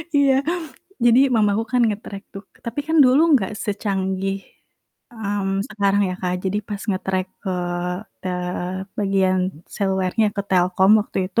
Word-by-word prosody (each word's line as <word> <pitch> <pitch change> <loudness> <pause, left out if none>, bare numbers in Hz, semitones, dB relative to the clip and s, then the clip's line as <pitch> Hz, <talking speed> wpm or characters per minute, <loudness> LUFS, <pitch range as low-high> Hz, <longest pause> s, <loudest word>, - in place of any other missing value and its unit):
Iya, 280 -1 +5 0.7
jadi 240 +1 +6
mama 210 -2 +4
aku 220 - 0
kan 250 -1 +4
nge-track 205 -2 -4
tuh, 195 +1 -8 0.2
tapi 235 +5 -2
kan 320 +1 +1
dulu 255 +3 +5 0.2
gak 190 -2 -4
secanggih, 195 -2 -1 0.8
mmm, 205 -3 -2 0.2
sekarang 200 -1 +1
ya, 185 - -3
Kak, 180 -1 -1
jadi 190 +2 0
pas 205 -1 -5
nge-track 190 -1 -1 0.2
ke 195 - -3 0.7
tele 180 +1 -3
bagian 195 -2 +2 0.4
selulernya, 190 +2 +1
ke 200 - 0
Telkom 185 +2 +4
waktu 205 - -4
itu, 215 - +1
195 Hz, 140 wpm, -22 LUFS, 190-215 Hz, 0.8 s, jadi